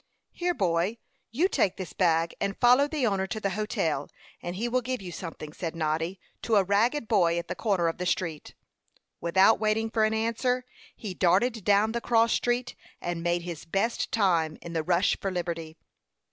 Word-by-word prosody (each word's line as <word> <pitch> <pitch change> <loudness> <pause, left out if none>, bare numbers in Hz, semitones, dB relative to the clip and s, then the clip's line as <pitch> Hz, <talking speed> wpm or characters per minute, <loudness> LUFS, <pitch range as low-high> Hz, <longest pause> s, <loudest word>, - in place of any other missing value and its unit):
"Here, 355 0 -1
boy, 185 - 0 0.3
you 300 - +2
take 195 - +1
this 185 - -6
bag, 165 -2 +2
and 200 0 -1
follow 250 +3 +5
the 295 -4 -1
owner 195 -3 0
to 220 +2 -4
the 195 -2 -1
hotel, 190 - -1 0.3
and 175 +1 -5
he 225 +5 -2
will 250 +1 +1
give 255 +1 -3
you 185 -3 -8
something," 160 -3 -7
said 165 -1 -5
Noddy 165 +3 -1 0.2
to 225 - +1
a 200 - +5
ragged 225 +7 +1
boy 175 -6 +3
at 170 - -3
the - - -3
corner 195 -6 0
of 165 - -3
the 180 - -2
street. 165 -4 -2 0.6
Without 190 +6 +4
waiting 220 +1 0
for 225 -1 +2
an 215 0 +2
answer, 250 +3 0 0.3
he 205 -5 -6
darted 200 +6 +2
down 205 +2 +3
the 235 +1 -2
cross 230 -1 +3
street, 245 +1 0 0.3
and 175 -1 -3
made 175 0 0
his 170 -3 -6
best 195 +7 -1
time 170 -7 +1
in 170 - -7
the 165 - 0
rush 175 +4 +2
for 195 - -1
liberty. 170 -3 -4
195 Hz, 190 wpm, -27 LUFS, 170-230 Hz, 0.6 s, follow